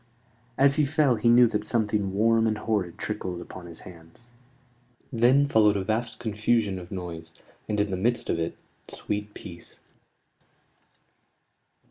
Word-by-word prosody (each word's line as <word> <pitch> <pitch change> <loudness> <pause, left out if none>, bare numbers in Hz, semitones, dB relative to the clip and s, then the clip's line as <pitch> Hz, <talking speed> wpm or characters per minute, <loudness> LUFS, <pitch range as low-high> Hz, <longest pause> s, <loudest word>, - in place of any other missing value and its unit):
As 140 +1 +4
he 155 - +4
fell 150 -2 +2
he 115 +1 +1
knew 120 +1 +7
that 105 -2 -2
something 105 -3 0
warm 115 +3 +3
and 110 -1 0
horrid 105 -6 -2
trickled 95 -4 -4
upon 90 0 -10
his 85 -1 -11
hands. 85 +7 -14 0.8
Then 125 +5 +4
followed 105 -6 +4
a 95 - -2
vast 115 +3 -2
confusion 110 -3 0
of 90 -1 -11
noise: 85 -3 -7 0.3
and, 105 -1 0
in 105 -1 0
the 95 - -1
midst 120 +5 0
of - - -1
it, 85 0 -3 0.3
sweet 105 0 -5
peace. 85 -2 -11
105 Hz, 145 wpm, -26 LUFS, 95-115 Hz, 0.8 s, knew